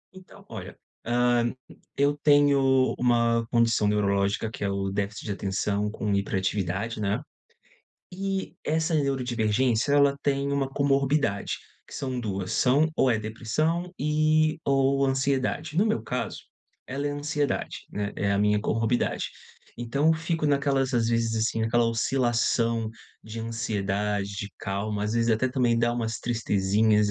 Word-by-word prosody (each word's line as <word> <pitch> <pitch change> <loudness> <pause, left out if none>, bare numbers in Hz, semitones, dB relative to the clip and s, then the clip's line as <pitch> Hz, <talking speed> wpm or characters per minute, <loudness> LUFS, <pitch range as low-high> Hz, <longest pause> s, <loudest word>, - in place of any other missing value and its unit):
Então, 185 -1 -15
olha, - - -8 0.3
hã 120 0 +2 0.5
eu 145 +1 +3
tenho 140 -3 +4
uma 115 -1 +2
condição 115 -3 +3
neurológica 100 0 +1
que - - -6
é 100 - 0
o 100 0 -2
déficit 100 +1 -3
de 105 - -3
atenção 100 +1 -1
com 105 -1 -2
hiperatividade, 100 +2 -1
né. 105 +4 0 0.9
E 195 +1 -3
essa 160 +1 0
neurodivergência 125 -3 +1
ela 140 -1 +4
tem 140 0 0
uma 140 -1 0
comorbidade, 140 -5 +1 0.3
que - - -12
são 130 -2 -3
duas: 95 -5 -3
"São 145 +5 +3
ou 130 - +3
é 110 - +2
depressão 155 +11 -2
e, 155 +1 +2
ou 135 0 +2
ansiedade." 135 +3 -1
No 200 - +4
meu 220 - 0
caso, 125 - -3 0.5
ela 140 +2 -3
é - - 0
ansiedade, 145 0 -2
né, 105 0 -3
é 100 0 0
a 100 - +1
minha 105 +1 +3
comorbidade. 115 +3 0 0.5
Então 120 +5 -1
eu 160 - +6
fico 165 -1 -1
naquelas 140 -2 +1
às 115 -1 +2
vezes, 115 -1 +1
assim, 110 0 0
naquela 115 +2 +2
oscilação 115 -1 +1 0.3
de 110 +1 -7
ansiedade, 105 -3 -2
de 100 - -4
calma, 100 +1 -3
às 105 - -1
vezes 115 0 +1
até 115 +3 +2
também 125 -3 +1
dá 120 0 +2
umas 115 -2 -2
tristezinhas, 105 -2 +2
120 Hz, 145 wpm, -26 LUFS, 105-140 Hz, 0.9 s, eu